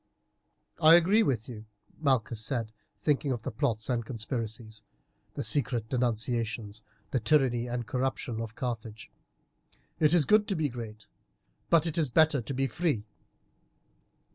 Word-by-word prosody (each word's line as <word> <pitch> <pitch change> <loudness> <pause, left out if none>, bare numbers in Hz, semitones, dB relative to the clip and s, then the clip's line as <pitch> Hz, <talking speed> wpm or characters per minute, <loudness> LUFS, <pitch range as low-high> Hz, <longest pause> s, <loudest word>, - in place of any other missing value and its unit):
"I 160 +1 +9
agree 185 +6 +5
with 125 - 0
you," 110 -4 -9 0.3
Malchus 120 -6 +1
said, 115 -2 -2 0.3
thinking 145 -1 0
of 120 -4 -3
the - - -4
plots 115 -3 -1
and 120 -2 -1
conspiracies, 110 -1 -5 0.5
the - - -3
secret 120 -6 +1
denunciations, 115 -3 -1 0.3
the 130 - +1
tyranny 120 -1 +2
and 120 0 -3
corruption 125 -1 -2
of 115 0 -7
Carthage, 115 -3 -5 0.9
"it 155 -2 +4
is 160 -5 +5
good 210 +4 +4
to 195 - -1
be 155 -3 0
great, 110 -3 -8 0.6
but 165 -1 +4
it 165 0 -1
is 150 -4 +1
better 150 +1 +3
to 135 - -5
be 135 +1 +1
free. 140 -4 -1
125 Hz, 140 wpm, -29 LUFS, 110-145 Hz, 0.9 s, I